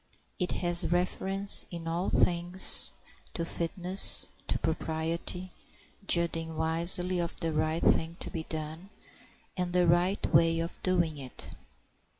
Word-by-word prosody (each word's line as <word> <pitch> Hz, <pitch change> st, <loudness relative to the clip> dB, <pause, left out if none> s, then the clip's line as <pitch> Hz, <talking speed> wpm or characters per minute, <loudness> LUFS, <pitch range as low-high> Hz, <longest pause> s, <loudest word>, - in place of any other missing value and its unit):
It 180 Hz, -1 st, -1 dB
has 175 Hz, 0 st, +1 dB
reference 190 Hz, +3 st, +4 dB
in 170 Hz, -1 st, -8 dB
all 170 Hz, +3 st, -2 dB
things 175 Hz, +1 st, +2 dB, 0.4 s
to 170 Hz, -, -3 dB
fitness, 180 Hz, +3 st, +2 dB, 0.2 s
to -, -, -1 dB
propriety, 165 Hz, +3 st, -3 dB, 0.6 s
judging 165 Hz, -2 st, 0 dB
wisely 170 Hz, +3 st, +1 dB
of 170 Hz, -1 st, -4 dB
the 165 Hz, -1 st, -3 dB
right 155 Hz, +2 st, -1 dB
thing 165 Hz, +1 st, +1 dB
to -, -, -6 dB
be 160 Hz, -1 st, -6 dB
done 160 Hz, +4 st, -6 dB, 0.7 s
and 180 Hz, -1 st, -3 dB
the 180 Hz, -1 st, +2 dB
right 175 Hz, +4 st, +1 dB
way 165 Hz, +1 st, +3 dB
of 165 Hz, +1 st, -6 dB
doing 170 Hz, -5 st, 0 dB
it. 130 Hz, -2 st, -8 dB
170 Hz, 130 wpm, -28 LUFS, 160-180 Hz, 0.7 s, reference